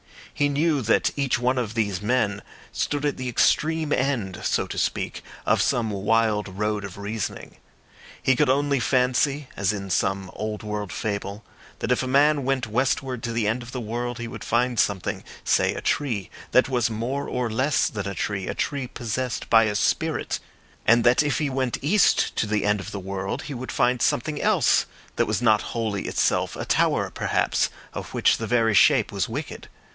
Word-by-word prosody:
He 145 0 +1
knew 145 0 +1
that 115 -1 +2
each 140 -4 +1
one 125 +1 +1
of 115 -2 -3
these 100 -4 0
men 105 -3 0 0.3
stood 145 0 -1
at 145 - 0
the 130 -1 -3
extreme 155 +5 +2
end, 120 -9 -1
so - - +1
to - - -7
speak, - - -2 0.2
of - - +3
some 115 -3 +1
wild 105 +1 +1
road 105 +2 -2
of 100 -2 -8
reasoning. 105 +2 -5 0.6
He 130 - +2
could 125 - +2
only 140 +1 +2
fancy, 130 +3 +1
as 100 -1 +1
in 100 -2 -5
some 95 0 0
old 110 0 -4
world 105 -2 -4
fable, 100 0 -4 0.3
that - - -2
if 125 - +2
a 130 - -3
man 145 +2 +4
went 135 0 0
westward 125 +2 -1
to 115 - -3
the 115 -2 0
end 115 +4 0
of 120 +1 -9
the 130 - -3
world 120 +2 -3
he 120 -1 -5
would 115 -2 -8
find 120 0 +1
something—say 100 -3 0
a - - -5
tree—that 130 -1 0
was 125 -3 +1
more 120 +6 -3
or 125 -1 -1
less 130 +6 +1
than 100 -2 -4
a 100 - -4
tree, 100 +2 -2
a - - -3
tree 140 -3 -2
possessed 120 +1 -3
by 115 0 +7
a 105 -1 -1
spirit; - - 0 0.5
and 115 0 +5
that 120 +3 +5
if 145 -2 0
he 150 -2 0
went 130 -2 -1
east 190 +7 +3
to 110 - +1
the 105 -1 0
end 105 0 +2
of 95 +1 -7
the 100 - -5
world 95 0 -4
he 145 - -6
would 130 0 -6
find 125 0 +1
something 150 +4 0
else - - +3 0.3
that - - +2
was 110 +2 -1
not 110 -2 +4
wholly 110 -4 -2
itself—a - - 0
tower, - - +1
perhaps, - - 0 0.2
of - - -7
which - - +3
the - - -4
very 115 -3 +2
shape 100 - +5
was - - -1
wicked. - - -6
115 Hz, 190 wpm, -24 LUFS, 105-130 Hz, 0.6 s, by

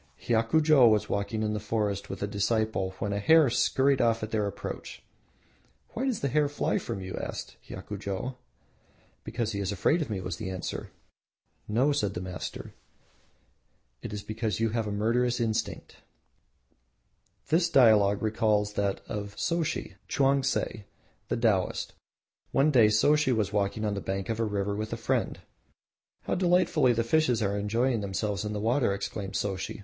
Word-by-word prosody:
Hiakujo 125 +3 +4
was 105 -1 +1
walking 100 +2 -1
in 105 0 0
the 105 - -2
forest 105 -2 -2
with 95 - -5
a - - 0
disciple 100 -2 0
when 100 -2 -2
a 100 - -1
hare 155 +4 +5
scurried 135 +2 +2
off 115 -1 +2
at 110 - -4
their 105 -2 0
approach. 100 - -7 0.9
"Why 255 - -3
does 250 -6 -1
the 140 - +1
hare 145 +2 +2
fly 145 - 0
from 95 - -5
you?" 95 0 -6
asked - - -6
Hiakujo. 105 +4 -5 0.9
"Because 115 0 -2
he 100 - -3
is 100 0 -1
afraid 105 - +2
of 150 - -3
me," 100 -3 -2
was 90 -2 -4
the 110 -4 -5
answer. 95 -1 -5 0.8
"No," 125 +7 +2
said 105 -9 -1
the - - -2
master, 90 -3 -6 1.3
"it - - -6
is 105 -1 -5
because 110 0 -3
you 115 0 +2
have 110 -1 -2
murderous 120 +4 +1
instinct." 110 -1 -2 1.5
The 170 +2 +3
dialogue 105 -7 +5
recalls 105 -1 +1
that 100 -1 -1
of 100 -2 -5
Soshi 165 -2 -2
(Chaungtse), 135 -5 +1 0.4
the - - -1
Taoist. 110 -6 0 0.6
One 140 +3 +3
day 115 -6 +6
Soshi 145 +6 +3
was 105 -4 0
walking 105 +1 0
on 105 - 0
the 100 - -3
bank 95 +2 -3
of 115 0 -2
a 115 - +1
river 100 -1 -1
with 110 +1 -4
a 115 - -3
friend. 115 - -1 0.8
"How - - -2
delightfully 175 -7 +3
the 115 0 0
fishes 125 -3 +2
are 100 0 0
enjoying 115 +4 0
themselves 100 0 -2
in 105 0 -3
the 105 - -3
water!" 115 -1 +1
exclaimed 100 -1 -5
Soshi. 95 -1 -3
110 Hz, 165 wpm, -28 LUFS, 100-125 Hz, 1.5 s, day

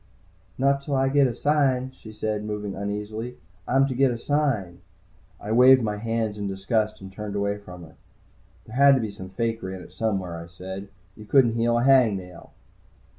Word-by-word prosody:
"Not 140 +1 +2
till 140 0 -2
I 135 0 +2
get 140 0 +4
a 120 - -4
sign," 130 -2 +1
she 115 -4 -13
said, 105 -1 -3
moving 105 -1 -4
uneasily. 105 +4 -5 0.3
"I'm 135 +2 +4
to 130 - -3
get 135 +1 +3
a 120 - -2
sign." 115 -11 -1 0.6
I 105 - -6
waved 125 +2 +7
my 105 -1 -2
hands 110 -1 -2
in 100 - -2
disgust 105 +2 -1
and 95 0 -10
turned 105 0 -6
away 100 0 -1
from 90 -3 -11
her. 80 - -14 0.7
"There 110 - -11
had 140 0 +7
to - - +1
be 110 -2 -3
some 95 -2 -9
fakery 110 -2 -3
in 95 - -9
it - - -15
somewhere," 95 -6 -2
I - - -12
said. 95 +3 -8 0.3
"You 105 - -12
couldn't 120 0 +4
heal 120 +1 +1
a 120 - +1
hang 130 -6 +5
nail!" 90 -2 -11
110 Hz, 195 wpm, -25 LUFS, 100-130 Hz, 0.7 s, waved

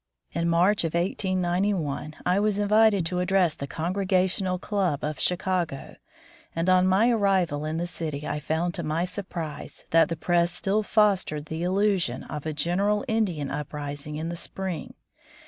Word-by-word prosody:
In 170 0 0
March 180 +5 +3
of 165 0 -2
1891 180 -4 -1
I 180 +2 +3
was 210 -1 +1
invited 205 -2 +4
to 180 +2 -1
address 180 -2 +2
the 140 - -6
Congregational 185 +3 0
Club 185 -6 -1
of 150 0 -3
Chicago, 180 -5 -1 0.6
and 165 +2 -1
on 185 0 +5
my 205 +6 +4
arrival 190 -9 +1
in 155 +1 -2
the 170 - -1
city 155 -4 -4
I 150 - -2
found 160 +4 -1
to - - -2
my 160 +3 -1
sur 180 +3 -5
prise 165 -5 -7
that 165 0 +5
the 165 - -3
press 175 +1 +2
still 200 +4 +1
fostered 200 -8 +2
the 160 +1 -5
illusion 185 -7 +1
of 150 0 -6
a - - -1
general 195 - +1
Indian 190 - 0
uprising 145 0 -5
in 160 +2 -3
the 170 - -4
spring. 180 -2 -5
175 Hz, 165 wpm, -26 LUFS, 155-195 Hz, 0.6 s, on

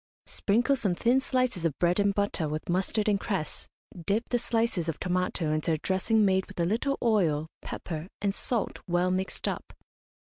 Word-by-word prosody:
Sprinkle 240 +7 +2
some 200 -8 0
thin 245 +7 +3
slices 255 -9 0
of 160 -4 0
bread 175 +2 +2
and 200 0 +4
butter 200 -6 0
with 155 +1 -4
mustard 190 +4 +1
and 205 -2 +3
cress, 190 -8 -3 0.4
dip 215 +4 0
the 245 - +2
slices 225 -8 0
of 160 - -3
tomato 180 -3 0
into 155 +1 +1
a - - +1
dressing 195 +6 +2
made 190 -1 +2
with - - -10
a 170 - +3
little 235 +9 0
oil, 175 -10 +2 0.2
pepper, 160 -1 -5
and 200 -1 0
salt, 230 +1 -2
well 175 +1 +2
mixed 185 +1 -2
up. - - -4
190 Hz, 180 wpm, -28 LUFS, 170-225 Hz, 0.4 s, and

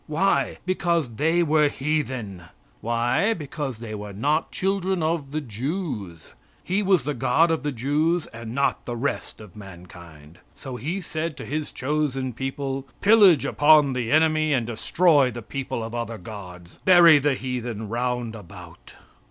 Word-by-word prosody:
Why? 165 +6 +1
Because 170 -9 -1
they 165 +3 +2
were 155 -1 +3
heathen. 130 - -3 0.3
Why? 120 - +1
Because 145 -5 -5
they 115 -1 -7
were 105 -1 -7
not 145 +10 0
children 190 -2 -1
of 155 -3 -1
the 155 +2 -3
Jews. 120 - -5 0.3
He 190 +3 0
was 190 -7 +2
the 150 +2 -2
God 145 +7 +2
of 160 - 0
the 145 +1 -2
Jews 150 +7 0
and 115 +1 -7
not 140 0 +1
of - - -34
the 120 - -4
rest 140 +4 -3
of 105 -5 -13
mankind. 85 -5 -13 0.2
So 130 -3 -8
He 165 +10 -4
said 160 -3 -4
to 135 - -7
His 150 +1 -4
chosen 135 -2 -2
people: 135 +2 -4
"Pillage 200 -9 +6
upon 145 -1 +4
the 120 -3 -2
enemy 155 0 +3
and 120 -4 +1
destroy 140 +5 +2
the 120 -1 -8
people 130 -2 -4
of 115 +1 -7
other 115 -1 -4
gods. 90 -3 -11
Buy 170 -4 +7
the 145 -1 +1
heathen 120 -4 -4
round 120 0 -2
about." 100 -6 -13
135 Hz, 160 wpm, -24 LUFS, 115-155 Hz, 0.3 s, Buy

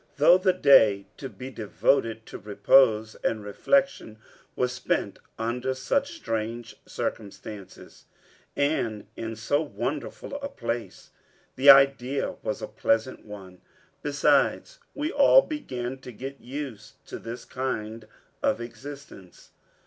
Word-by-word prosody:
Though 170 +6 +6
the 185 0 +3
day 110 - +5
to 135 - -6
be 125 +5 -9
devoted 110 +1 0
to - - -9
repose 110 +2 +3
and 110 -2 -1
reflection 265 - 0 0.4
was 125 0 0
spent 125 - -2 0.2
under 125 +3 -2
such 280 - -1
strange 115 - -4
circumstances, 100 -1 -7 0.5
and 120 -8 -1
in 115 0 -5
so 130 +7 0
wonderful 145 - -5
a 280 - -4
place, 120 - -5 0.4
the 135 +2 +5
idea 135 -1 +5
was - - -4
a - - -3
pleasant 115 +3 -1
one. 95 -4 -11 0.4
Besides, 145 - +1 0.2
we 295 +3 -2
all - - +6
began 130 - -5
to 125 - -10
get 135 +4 -8
used 125 -6 -7
to - - -8
this 115 +2 -8
kind 110 -4 -4 0.3
of - - +1
existence. 120 -4 -11
125 Hz, 120 wpm, -26 LUFS, 110-140 Hz, 0.5 s, Though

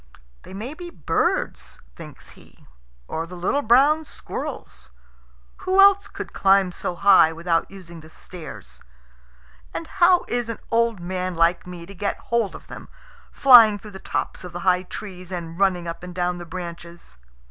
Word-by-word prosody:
"They 190 - -12
may 230 +8 -6
be 350 +2 -9
birds," 165 - -2 0.2
thinks - - -12
he, - - -19 0.4
"or 165 +1 -4
the 180 - -10
little 185 +11 0
brown 285 +6 +4
squirrels. 175 - -7 0.7
Who 375 +1 0
else 400 0 +6
could - - -8
climb 195 -1 +3
so 175 - -5
high 190 -3 +5
without 165 0 -1
using 175 -4 -11
the 155 - -15
stairs? 105 - -11 0.9
And 330 - -4
how 360 0 +3
is 240 -1 -2
an 230 - -4
old 230 -3 +1
man 185 +1 -4
like 170 +2 +1
me 175 -1 -9
to 200 - -12
get 200 +1 -3
hold 230 -4 -2
of - - -12
them, - - -11 0.4
flying 230 -6 +7
through 210 +1 -12
the 190 - -10
tops - - -4
of 180 -1 -9
the 175 - -6
high 180 0 +2
trees 185 -1 -9
and 170 -1 -6
running 180 -3 +1
up 170 - -6
and 180 0 -9
down 180 0 -1
the 175 - -9
branches?" 170 - -9
185 Hz, 170 wpm, -23 LUFS, 170-230 Hz, 0.9 s, flying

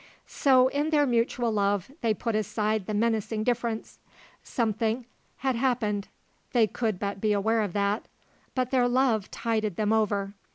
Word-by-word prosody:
So, 260 -2 +4
in 290 +3 -1
their 295 -2 +3
mutual 235 -1 +1
love, 200 +1 0
they 225 -3 +1
put 230 0 -2
aside 215 -1 -1
the 215 - -2
menacing 220 0 0
difference. 235 -1 -2 0.4
Something 225 +1 -1 0.3
had 265 -1 0
happened, 230 -5 0 0.5
they 235 -3 +5
could 215 -2 -2
but 200 0 -4
be 215 -1 +2
aware 220 +3 +2
of 205 -4 -2
that; 200 +1 0 0.5
but 255 -1 0
their 250 -2 +3
love 245 -5 +2
tided 220 -4 -1
them 215 +2 +1
over. 205 -2 0
220 Hz, 155 wpm, -27 LUFS, 210-245 Hz, 0.5 s, they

